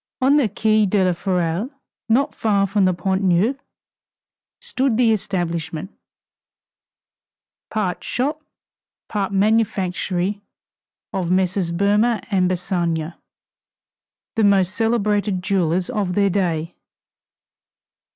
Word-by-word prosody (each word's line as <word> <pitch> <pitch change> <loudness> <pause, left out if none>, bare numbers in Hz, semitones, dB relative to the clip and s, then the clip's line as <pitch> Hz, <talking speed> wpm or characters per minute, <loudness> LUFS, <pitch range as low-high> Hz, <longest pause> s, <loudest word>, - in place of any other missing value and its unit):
On 275 +2 +4
the 260 -7 +2
Quai 215 +1 +2
de 190 0 +2
la 180 - +2
Ferraille, 180 +3 -1 0.4
not 275 +6 +2
far 200 -3 +1
from 195 0 +1
the 185 - +3
Pont 190 +2 -1
Neuf, 195 +8 +2 1.0
stood 270 - 0
the 240 -2 +4
establishment, 175 -3 -2 1.8
part 205 -5 -2
shop, 290 +5 -2 0.7
part 200 -3 -2
manufactory, 200 -2 0 0.7
of 185 -3 -2
Messrs. 185 -1 +1
Boehmer 205 +5 +2
& 250 - -21 0.2
Bassange, 175 -3 -1 1.2
the 225 - +2
most 195 -2 +3
celebrated 210 -4 0
jewelers 180 -2 +1
of 205 -7 -2
their 200 -1 +3
day. 170 -3 -1
195 Hz, 100 wpm, -21 LUFS, 180-215 Hz, 1.8 s, On